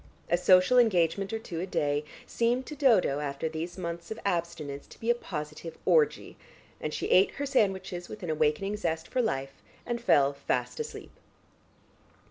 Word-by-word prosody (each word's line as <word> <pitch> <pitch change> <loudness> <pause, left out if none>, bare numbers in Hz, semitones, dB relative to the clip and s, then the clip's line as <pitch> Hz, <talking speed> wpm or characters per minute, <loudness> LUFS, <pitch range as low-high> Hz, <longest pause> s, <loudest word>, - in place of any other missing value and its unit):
A - - +6
social 185 +7 +5
engagement 195 -3 +2
or 225 - -1
two 180 -7 -6
a 185 - -3
day, 145 -4 0 0.2
seemed 240 +2 0
to 300 - -7
Dodo 225 - +3
after 140 +1 -3
these 160 +3 -5
months 170 -1 -5
of 220 - -5
abstinence 165 -6 -2
to - - -15
be 230 +1 +2
a - - +5
positive 160 -7 -7
orgy, 460 -2 +2 0.4
and - - -3
she - - -3
ate 190 - +5
her 285 - -2
sandwiches 190 -9 0
with 215 -2 -9
an 170 - -2
awakening 155 +7 +1
zest 160 -5 -2
for 255 - 0
life, 135 - -3 0.2
and 240 -1 -3
fell 145 -10 +4
fast 140 - -2
asleep. 460 0 -6
180 Hz, 170 wpm, -29 LUFS, 155-225 Hz, 0.4 s, A